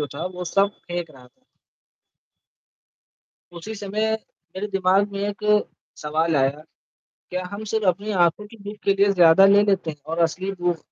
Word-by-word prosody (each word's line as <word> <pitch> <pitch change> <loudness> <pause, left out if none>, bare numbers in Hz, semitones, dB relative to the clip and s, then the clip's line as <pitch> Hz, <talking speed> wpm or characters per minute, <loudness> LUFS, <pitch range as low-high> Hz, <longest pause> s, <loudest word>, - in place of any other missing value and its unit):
जो 145 - -1
था - - -4
वो 180 - -4
सब 200 0 +4 0.2
फेंक 175 -2 -4
रहा 125 -2 -16
था। 260 - -31 2.1
उसी 190 +6 -8
समय, 215 +2 -2 0.4
मेरे 205 +2 -3
दिमाग 195 +1 +2
में 195 - -5
एक 205 +1 -7 0.6
सवाल 155 +1 0
आया, 140 +2 +1 0.7
क्या 180 0 -3
हम 210 +2 -6
सिर्फ़ 220 -2 -1
अपनी 200 +4 -1 0.2
आँखों 210 +5 -3
की 225 - -15
भूख 205 +1 -7
के 195 - +3
लिए 200 0 +3
ज़्यादा 175 +1 +6
ले 200 +1 +6
लेते 190 -5 0
हैं 150 - -10 0.2
और 165 - -2
असली 185 +4 -1
भूख 175 -2 +1
190 Hz, 170 wpm, -23 LUFS, 165-205 Hz, 2.1 s, ज़्यादा